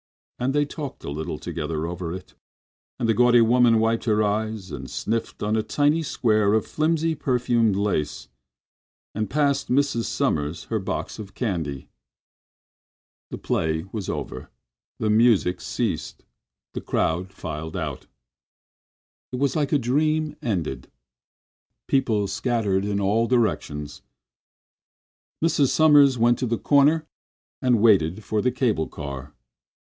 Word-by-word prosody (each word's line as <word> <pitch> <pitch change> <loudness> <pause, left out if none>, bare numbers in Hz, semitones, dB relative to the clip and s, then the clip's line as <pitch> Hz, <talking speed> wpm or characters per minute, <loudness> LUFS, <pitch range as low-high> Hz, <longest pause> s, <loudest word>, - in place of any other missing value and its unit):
And 130 +3 0
they 145 0 +3
talked 145 -2 -7
a - - -5
little 75 +2 -4
together 80 +1 -4
over 85 0 -4
it. 90 +1 -8 0.6
And 115 - -1
the 115 - +3
gaudy 120 +1 +5
woman 120 0 +5
wiped 115 +1 +1
her 110 -2 +2
eyes 105 -2 -2
and 65 -3 -7
sniffled 115 0 -3
on 105 +1 +1
a 110 - +2
tiny 145 +8 +1
square 110 -8 +2
of 110 - +1
filmy, 160 +1 0
perfumed 120 -6 +1
lace 95 -7 -1 0.9
and 105 -1 -2
passed 140 +1 +1
little 140 +3 +4 0.2
Mrs. - - -4
Sommers 75 +3 -1
her 110 - -2
box 95 - -4
of 100 -2 -9
candy. 80 - -3 1.4
The - - -6
play 80 0 -1
was 105 -4 -4
over, - - -5 0.5
the 110 - 0
music 110 -5 +3
ceased, - - -3 0.5
the - - -4
crowd 90 +4 -1
filed 80 -1 -6
out. 75 -6 -5 1.2
It 125 - -3
was 140 +3 0
like 145 -3 0
a 150 - +4
dream 150 +4 0
ended. 85 - -3 1.0
People 115 -7 +1
scattered 100 -2 0
in 100 -1 -1
all 105 +4 +2
directions. 75 - -1 1.4
Mrs. 145 -4 +3
Sommers 145 -4 +5
went 120 +1 +3
to 130 - -1
the 115 0 0
corner 150 +5 +3 0.6
and 125 -4 +3
waited 100 -3 +3
for 105 0 -1
the 125 - +1
cable 120 - 0
car. 70 0 -8
110 Hz, 135 wpm, -24 LUFS, 90-130 Hz, 1.4 s, gaudy